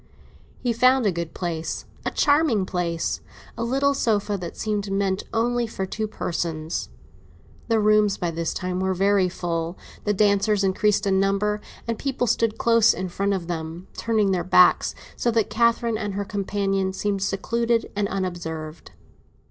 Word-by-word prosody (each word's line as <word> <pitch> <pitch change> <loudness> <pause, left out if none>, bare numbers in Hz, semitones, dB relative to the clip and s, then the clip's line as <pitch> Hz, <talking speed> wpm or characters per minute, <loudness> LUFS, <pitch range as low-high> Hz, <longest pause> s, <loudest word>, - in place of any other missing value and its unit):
He 240 -2 +1
found 255 +1 +4
a 200 - +3
good 170 -2 -5
place—a 165 -3 -4
charming 285 - +3
place; 170 -2 -2 0.3
a 230 - -3
little 275 +4 +2
sofa 210 -5 0
that 180 -3 -6
seemed 210 -2 -2
meant 195 -1 0
only 240 +1 +1
for 190 -3 -4
two 215 +3 -3
persons. 165 -5 -3 0.8
The 225 -1 +2
rooms 210 -1 +3
by 175 -2 -2
this 165 0 -2
time 185 0 -3
were 190 0 0
very 195 0 +3
full; 170 -1 -3 0.3
the 210 - +1
dancers 200 0 +3
increased 205 +2 +2
in 190 -1 +2
number, 200 +2 +1 0.3
and 230 -1 -2
people 265 -3 -1
stood 230 -2 +1
close 230 -1 +4
in 185 0 -3
front 200 +3 0
of 180 -3 -4
them, 165 +1 -5
turning 215 -4 +1
their 180 -2 0
backs, 180 0 +5 0.2
so 240 - 0
that 225 -2 +1
Catherine 230 0 +2
and 205 -3 -3
her 200 0 -2
companion 195 -1 -1
seemed 200 0 -1
secluded 230 +4 0
and 205 0 0
unobserved. 170 -5 -5
200 Hz, 155 wpm, -24 LUFS, 185-225 Hz, 0.8 s, backs